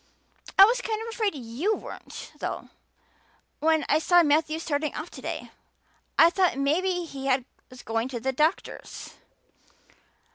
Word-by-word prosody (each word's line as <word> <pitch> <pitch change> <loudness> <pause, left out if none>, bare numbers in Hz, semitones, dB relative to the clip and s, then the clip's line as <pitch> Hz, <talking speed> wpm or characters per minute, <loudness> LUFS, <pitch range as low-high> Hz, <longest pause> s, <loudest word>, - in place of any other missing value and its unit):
"I 390 - +11
was 485 +3 +1
kind 440 -2 -2
of 450 +1 -5
afraid 435 -5 -1
you 270 - -1
weren't, - - -9
though, - - -4 0.9
when 315 0 +2
I 305 - +3
saw 350 +2 +5
Matthew 310 +1 +2
starting 305 -2 -2
off 310 +3 -6
today. - - -6 0.7
I 330 +1 +7
thought 365 -5 +2
maybe 355 +6 +1
he 275 -3 -3 0.4
was 255 -1 -13
going 225 +2 -1
to 255 -2 -5
the 265 +3 -1
doctor's." 305 +7 -2
315 Hz, 140 wpm, -26 LUFS, 275-370 Hz, 0.9 s, I